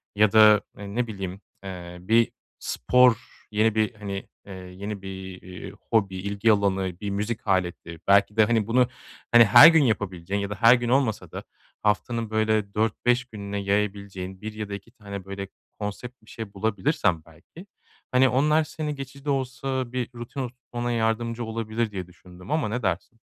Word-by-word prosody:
ya 105 0 +4
da 110 -1 +7 0.2
e, 100 0 -8
ne 125 0 0
bileyim, 95 -2 -6 0.2
eee, 90 -2 -8
bir 115 +5 +3 0.3
spor, 125 -2 +3 0.3
yeni 110 +1 +2
bir, 110 +1 +1
hani, 100 -2 -6 0.2
eee, 100 - -8
yeni 95 +2 -7
bir, 95 -1 -8
iii, 90 0 -9 0.2
hobi, 100 -4 +2
ilgi 100 +3 +1
alanı, 95 -3 0
bir 100 - -3
müzik 105 +3 -3
aleti 90 -3 -1
belki 100 +2 +4
de, 110 - +6
hani, 110 -2 +1
bunu, 125 +1 +3 0.4
hani, 120 -1 +8
her 105 +9 +10
gün 160 -2 +6
yapabileceğin 100 -4 -1
ya 100 - -3
da 105 - -4
her 115 +4 +7
gün 120 -1 -2
olmasa 125 -4 +1
da - - -6 0.4
haftanın 110 +2 0
böyle 110 -2 0
4-5 120 +4 +1
gününe 100 -3 -6
yayabileceğin 100 -2 -2
1 110 0 -6
ya 105 -1 -6
da - - -5
2 100 +3 -8
tane 100 -5 -9
böyle 100 0 -6 0.3
konsept 110 +4 -6
bir 110 - -19
şey 110 -3 -8
bulabilirsen 100 - 0
belki, 85 - -15 0.5
hani, 130 +1 +5
onlar 150 +6 +3
seni 150 -1 -4
geçici 135 0 -9
de - - -2
olsa 130 -1 -2
bir 125 -2 -2
rutin 120 +4 -7
oturtmana 120 -1 -5
yardımcı 115 +1 -1
olabilir 110 0 -2
diye 95 -3 -5
düşündüm 90 +4 -13
ama 155 -7 +1
ne 125 +3 -3
dersin? 95 +5 -2
105 Hz, 170 wpm, -25 LUFS, 100-120 Hz, 0.5 s, her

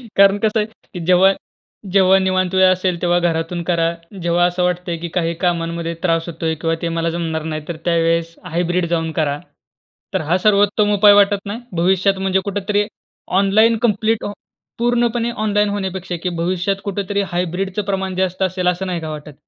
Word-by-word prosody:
कारण 200 0 +6
कसं 220 +1 +1
आहे, 210 - +1
की 210 -4 -13
जेव्हा, 185 +2 +5 0.6
जेव्हा 190 -1 +5
निवांत 185 0 0
वेळ 190 - +6
असेल 185 -2 -1
तेव्हा 175 0 +2
घरातून 170 0 -1
करा. 165 -1 +1 0.3
जेव्हा 175 +1 +2
असं 180 0 0
वाटतंय, 180 -1 -1
की 170 +1 -5
काही 165 -1 0
कामांमध्ये 170 -1 -1
त्रास 165 -2 +1
होतोय 160 -1 -2
किंवा 165 -1 +1
ते 170 - -1
मला 165 0 0
जमणार 165 -2 -3
नाही 155 - -3
तर 170 - -4
त्यावेळेस, 165 0 +1
हायब्रिड 175 +1 0
जाऊन 165 -1 -1
करा. 145 -1 0 0.7
तर - - 0
हा 165 +4 +1
सर्वोत्तम 205 +1 +3
उपाय 205 0 +7
वाटत 205 0 +3
नाही. 205 +4 -4 0.2
भविष्यात 190 +3 +2
म्हणजे 190 0 +1
कुठेतरी 205 +1 -1 0.5
ऑनलाईन, 220 +4 +4
कंप्लीट 220 0 +1
अ, 205 - -3 0.5
पूर्णपणे 235 0 +1
ऑनलाईन 210 0 +2
होण्यापेक्षा, 190 -3 -3
की 180 - 0
भविष्यात 185 +3 0
कुठेतरी 200 0 -2
हायब्रिडचं 185 +3 -2
प्रमाण 190 -1 -2
जास्त 185 0 -1
असेल, 185 -1 -1
असं 180 +2 0
नाही 175 -2 -3
का 160 - -5
वाटत? 150 -1 -8
185 Hz, 170 wpm, -19 LUFS, 170-200 Hz, 0.7 s, उपाय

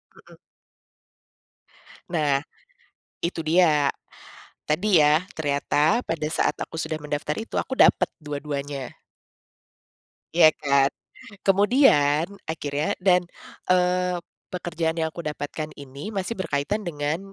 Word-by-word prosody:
Mhm. - - -17 1.7
Nah, 150 -5 +1 0.8
itu 170 0 -2
dia, 155 -3 +4 0.8
tadi 180 +4 +3
ya 150 +3 +4
ternyata 150 +7 +1
pada 160 -2 -2
saat 155 - 0
aku - - -6
sudah 160 -1 -3
mendaftar 150 0 -3
itu 225 - -7
aku 260 - -2
dapet - - +5
dua-duanya. 145 -2 -5 1.4
Iya 170 -2 +8 0.2
kan, 140 -1 +4 0.6
kemudian 195 - +4 0.2
akhirnya 150 -2 -2 0.2
dan, 180 -1 +5 0.5
eee, 180 0 +2 0.4
pekerjaan 170 -2 -2
yang 160 0 0
aku 170 - -7
dapatkan 150 0 -4
ini 140 +3 -9
masih 195 +4 -2
berkaitan 165 +4 -1
dengan 150 0 -2
155 Hz, 105 wpm, -24 LUFS, 145-180 Hz, 1.7 s, Iya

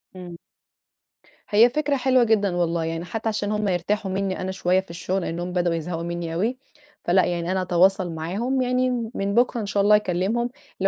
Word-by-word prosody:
إمم. 175 -2 -9 1.1
هي 220 +4 +6
فكرة 290 +2 0
حلوة 255 -1 +3
جدًا 205 -5 +2
والله 170 -1 0
يعني، 165 +1 -3
حتى 225 +4 -3
عشان 210 -1 -2
هم 210 0 -1
يرتاحوا 190 +2 -1
منّي 190 -1 -2
أنا 190 +1 -3
شوية 185 -1 +1
في 190 - -8
الشغل 175 +3 -2
لإنهم 175 +1 -4
بدأوا 175 -2 +1
يزهقوا 165 +1 -4
مني 170 -1 -4
اوي، 220 +10 -1 0.5
فلأ 185 +2 +3
يعني 175 0 -2
أنا 185 0 0
هاتواصل 185 0 +2
معاهم 215 +12 -1
يعني 250 -2 0
من 200 0 -1
بكرة 240 -1 +2
إن - - -3
شاء 200 0 0
الله 210 +1 +6
هاكلمهم، 210 +4 0 0.3
اللي - - +1
190 Hz, 190 wpm, -23 LUFS, 175-220 Hz, 1.1 s, هي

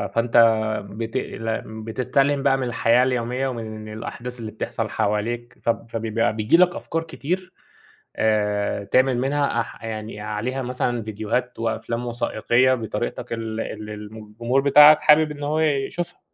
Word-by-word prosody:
فأنت 115 0 +2 0.5
بت 110 +2 -4
ل 115 0 -3 0.2
بتستلهِم 135 +5 0
بقى 135 - +3
من 135 - -2
الحياة 120 +1 +3
اليومية 125 +1 -1
ومن 110 -3 -6
الأحداث 120 +3 -7
اللي 110 -2 -6
بتحصل 110 0 -4
حواليك، 110 +3 -2
فب 115 0 -1
فبيبقى 115 -1 0
بييجي 110 +8 +3
لك 180 0 +4
أفكار 165 0 -3
كتير 180 +3 -4 0.6
آآ 105 -2 0
تعمل 130 +3 +2
منها 140 -1 +1
أح 115 - -7
يعني 110 -1 -5
عليها 110 +5 -3
مثلًا 125 -1 -2
ڤيديوهات 110 +4 -3
وأفلام 115 +1 -2
وثائقية 120 +2 +2
بطريقتك 110 -1 -4
ال 115 -1 -3
ال 105 -1 -6
م - - -10
الجمهور 120 +5 0
بتاعك 150 +2 +8
حابب 155 +1 +5
إن 145 -1 -7
هو 150 +2 0
يشوفها. 160 +3 -1
120 Hz, 145 wpm, -23 LUFS, 110-135 Hz, 0.6 s, بتاعك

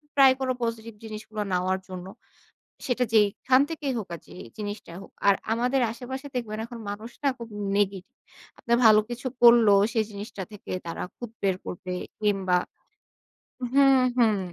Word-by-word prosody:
Try 270 -2 +8
করো 260 -1 0
positive 230 -1 -3
জিনিসগুলো 215 0 -6
নেওয়ার 185 +1 +1
জন্য। 185 0 -7 0.8
সেটা 250 -1 +1
যেখান 220 +5 +4
থেকেই 295 -4 -2
হোক 210 - -6
আর - - -9
যে, - - -13 0.2
জিনিসটাই 205 -4 -6
হোক।" - - -13 0.2
আর 200 - +7 0.2
আমাদের 250 +4 +1
আশেপাশে 260 +4 -7
দেখবেন, 215 -3 -3
এখন 235 -1 -9
মানুষ 215 +3 -7
না? - - +5
খুব 235 -1 -8 0.3
নেগেটিভ। 195 -2 -1 0.4
আপনারা 235 0 +1
ভালো 215 -1 +8
কিছু 240 +2 -5 0.2
করলেও, 230 -4 +7
সেই 220 -2 +2
জিনিসটা 200 -1 -7
থেকে 205 - -8
তারা 170 - -4 0.2
খুত 240 -2 -7
বের 190 -2 +2
করবে 180 0 -5 0.3
কিংবা 195 -4 +2 1.2
হুম, 270 -2 +6 0.2
হুম। 220 -4 +4
220 Hz, 155 wpm, -26 LUFS, 200-245 Hz, 1.2 s, Try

